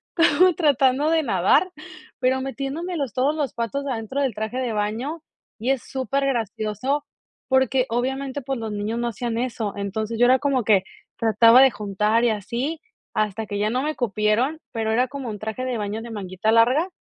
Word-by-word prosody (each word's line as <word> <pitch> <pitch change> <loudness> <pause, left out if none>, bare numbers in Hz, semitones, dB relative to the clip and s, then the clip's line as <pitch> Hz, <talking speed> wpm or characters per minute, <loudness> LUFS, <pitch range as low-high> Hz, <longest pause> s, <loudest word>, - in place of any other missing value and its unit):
como 355 +1 +5
tratando 285 -1 +3
de 325 -1 +3
nadar, 225 - +2 0.5
pero 260 +1 +1
metiéndome 280 +6 -4
los 270 -8 -3
todos 275 +4 +1
los 290 -3 -2
patos 255 +5 -3
adentro 255 +1 -3
del 265 -4 0
traje 220 +4 -4
de 250 -4 -1
baño, 230 +10 -2 0.4
y 240 +4 -2
es 270 -3 +1
supergracioso, 260 -1 -2 0.4
porque, 260 -1 +2
obviamente, 265 +3 -2
pues, 270 0 -3
los 220 -1 -4
niños 210 +3 -3
no 240 0 -1
hacían 230 +1 -3
eso. 230 -4 -2
Entonces 215 +3 -3
yo 245 - +5
era 255 +1 +5
como 275 -4 +1
que 205 -3 +4 0.3
trataba 230 +3 +6
de 270 - +7
juntar, 210 +2 0
y 240 - +4
así 245 +9 -3 0.3
hasta 215 +1 -1
que 205 -1 -4
ya 210 +1 +1
no 255 +4 -1
me 305 +1 -2
cupieron, 235 +6 0
pero 220 -1 -1
era 250 +3 +2
como 270 -2 -6
un 210 - -5
traje 220 +4 -4
de 250 -2 -2
baño 210 +1 -3
de 235 - -8
manguita 195 +1 -2
larga, 250 +10 +4
245 Hz, 185 wpm, -23 LUFS, 220-270 Hz, 0.5 s, de